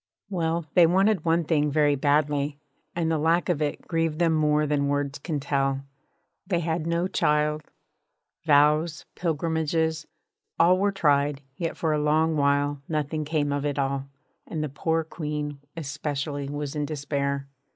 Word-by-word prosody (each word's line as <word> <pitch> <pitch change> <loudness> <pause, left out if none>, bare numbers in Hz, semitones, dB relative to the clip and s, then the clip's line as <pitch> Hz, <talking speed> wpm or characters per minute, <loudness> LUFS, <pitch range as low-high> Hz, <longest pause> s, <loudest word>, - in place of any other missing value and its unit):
Well, 170 -2 -1
they 175 -3 +7
wanted 190 0 +2
one 165 +1 +3
thing 150 -2 +1
very 145 0 +3
badly, 145 0 +1 0.4
and 165 -1 0
the 160 - +1
lack 165 +4 +2
of 165 -4 +1
it 150 -1 -2
grieved 165 -2 0
them 170 -1 +3
more 150 -1 +2
than 145 -1 +1
words 145 0 -1
can 150 0 -3
tell. 135 -1 0 0.6
They 175 -4 +1
had 160 0 -2
no 170 +2 +1
child. 150 -3 +1 0.8
Vows, 150 +1 +3
pilgrimages, 160 -1 -1 0.5
all 180 +2 +5
ways - - -2
were 200 0 +3
tried; 145 -6 +2
yet 165 +1 -3
for 160 -2 0
a 150 - +1
long 155 +2 +2
while 145 0 +1
nothing 155 0 -1
came 145 -2 0
of 145 0 -1
it 145 -1 -1
all, 135 0 -1 0.4
and 155 -2 -3
the 150 - -2
poor 160 +4 0
Queen 150 -2 -4 0.2
especially 145 -1 -3
was 145 0 -4
in 150 -1 -1
despair. 140 -2 -2
150 Hz, 160 wpm, -26 LUFS, 145-165 Hz, 0.8 s, they